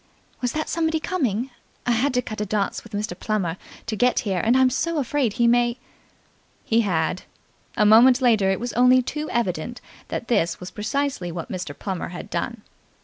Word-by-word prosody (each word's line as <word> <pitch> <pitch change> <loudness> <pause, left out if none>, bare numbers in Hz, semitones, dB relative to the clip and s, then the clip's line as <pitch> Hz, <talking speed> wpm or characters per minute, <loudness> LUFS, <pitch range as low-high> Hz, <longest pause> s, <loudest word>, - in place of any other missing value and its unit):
"Was 245 -1 -1
that 310 0 -2
somebody 320 -1 0
coming? 260 - -1 0.3
I 245 - +2
had 240 +5 +2
to 250 - +2
cut 215 -2 -5
a - - 0
dance 200 0 -1
with 225 - -14
Mr. 210 +2 -2
Plummer 195 -6 -1 0.3
to 220 - -3
get 245 +4 +2
here, 195 -6 -1
and 235 +3 +4
I'm 260 -1 +4
so 330 +5 -1
afraid 270 -4 0
he 235 +1 +2
may.. 240 0 +3 0.5
." - - -37
He 230 +1 +5
had. 180 -3 0 0.6
A 210 - +4
moment 240 +5 +7
later 225 -7 +3
it 195 - 0
was 245 0 -4
only 250 +1 +5
too 300 +4 -4
evident 235 +1 -2 0.3
that 235 - -4
this 170 -8 +1
was 180 0 -8
precisely 220 -4 -2
what 165 0 -6
Mr. 180 -6 -5
Plummer 190 -3 -4
had 175 - -8
done. 210 +6 -3
235 Hz, 195 wpm, -23 LUFS, 195-255 Hz, 0.6 s, moment